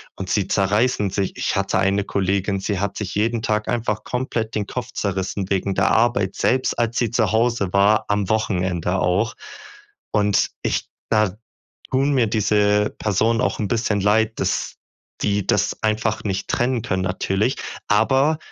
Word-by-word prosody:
Und 95 -1 -6
sie 95 +1 +1
zerreißen 105 +2 +1
sich. 95 0 -2
Ich - - -1
hatte 100 0 +1
eine 100 +1 +2
Kollegin, 100 0 0
sie 100 0 -2
hat 100 0 -2
sich 100 -3 -4
jeden 115 +2 0
Tag 105 -1 -1
einfach 110 -3 -1
komplett 120 -3 -3
den 105 -2 -2
Kopf 125 +1 -5
zerrissen 95 -1 -2
wegen 95 0 0
der - - +2
Arbeit, 110 -4 +2
selbst 130 +1 +1
als 120 0 0
sie 120 -3 +1
zu 110 -4 +1
Hause 115 -3 +1
war, 100 +2 +4
am 105 -2 0
Wochenende 95 -4 0
auch. 100 +6 +1 0.8
Und 105 -1 +2
ich - - -1 0.2
da 105 -3 +2 0.6
tun 135 +2 +2
mir 125 -4 +3
diese 105 -1 +2
Personen 110 +3 +1
auch 125 - 0
'n 105 - -1
bisschen 110 -2 0
Leid, 110 +2 +2
dass - - -1 0.5
die 100 -2 0
das 105 0 +1
einfach 110 0 0
nicht 95 -2 -2
trennen 120 -1 0
können 95 -2 -1
natürlich, 95 +5 0 0.3
aber 135 +8 +3
105 Hz, 160 wpm, -21 LUFS, 100-115 Hz, 0.8 s, war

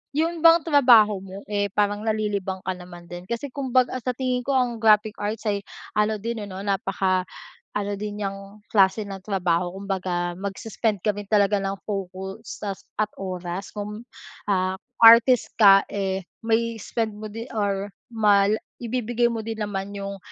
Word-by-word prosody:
yun 330 +2 0
bang 330 0 +7
trabaho 240 - +5
mo, 195 +1 -9
eh, 205 0 -1
parang 205 0 +1
nalilibang 205 -4 -2
ka 190 - 0
naman 180 -1 -11
din 175 +1 -9
kasi 235 +4 -3
kumbaga 255 -2 +1
sa 250 +1 -2
tingin 255 -1 0
ko 270 +2 0
ang 240 -3 0
graphic 215 -1 +4
arts 210 +2 -3
ay 200 -1 0 0.3
ano 210 +1 +1
din 230 +2 -4
ano 185 - -7
napaka 195 -1 0 0.5
ano 205 0 -2
din 210 0 -5
niyang 195 +1 -6
klase 200 +1 +3
ng 195 -1 -8
trabaho 180 -3 0
kumbaga 185 -3 -2
mag-suspend 200 +2 -2
ka 210 0 0
rin 205 0 -6
talaga 205 -1 +4
ng 195 0 -3
focus 190 -1 -5 0.4
at 215 0 +2
oras 185 0 -5
kung, 210 +1 -6 0.5
ah, 185 -1 +1 0.2
artist 230 +2 +7
ka, 195 -1 +8
eh, 190 -2 -2 0.2
mai-i-spend 225 -1 -1
mo 215 +1 -8
din 225 +2 -7
or 200 -2 -1 0.2
mal 205 -3 +4 0.3
ibibigay 240 0 0
mo 230 - -3
din 225 -1 -4
naman 200 -1 -4
yung 200 0 -5
205 Hz, 155 wpm, -24 LUFS, 195-225 Hz, 0.5 s, ka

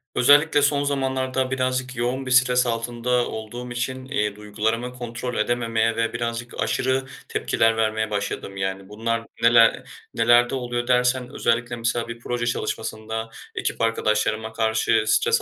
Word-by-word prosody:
Özellikle 145 +3 +5
son 145 0 +2
zamanlarda 130 -2 -1
birazcık 130 0 -1
yoğun 125 +3 -2
bir 130 - -4
stres 125 0 +4
altında 120 +1 0
olduğum 120 +3 -7
için, 130 +2 -3
iii, 105 -7 -1
duygularımı 110 +4 -2
kontrol 120 0 -5
edememeye 115 0 0
ve 115 0 -1
birazcık 115 +1 -4
aşırı 130 +1 0 0.2
tepkiler 115 0 +1
vermeye 110 -1 0
başladım. 100 -1 -4
Yani, 95 0 -3
bunlar 115 +2 -2 0.2
neler 115 0 +5 0.3
nelerde 120 +2 +4
oluyor 120 -2 -3
dersen 125 0 +2
özellikle 120 +1 0
mesela 115 0 -1
bir 115 0 -7
proje 120 0 -3
çalışmasında 110 -1 -3 0.3
ekip - - -2
arkadaşlarıma 110 -1 0
karşı 110 0 +2
stres 460 - +3
120 Hz, 135 wpm, -23 LUFS, 110-125 Hz, 0.3 s, Özellikle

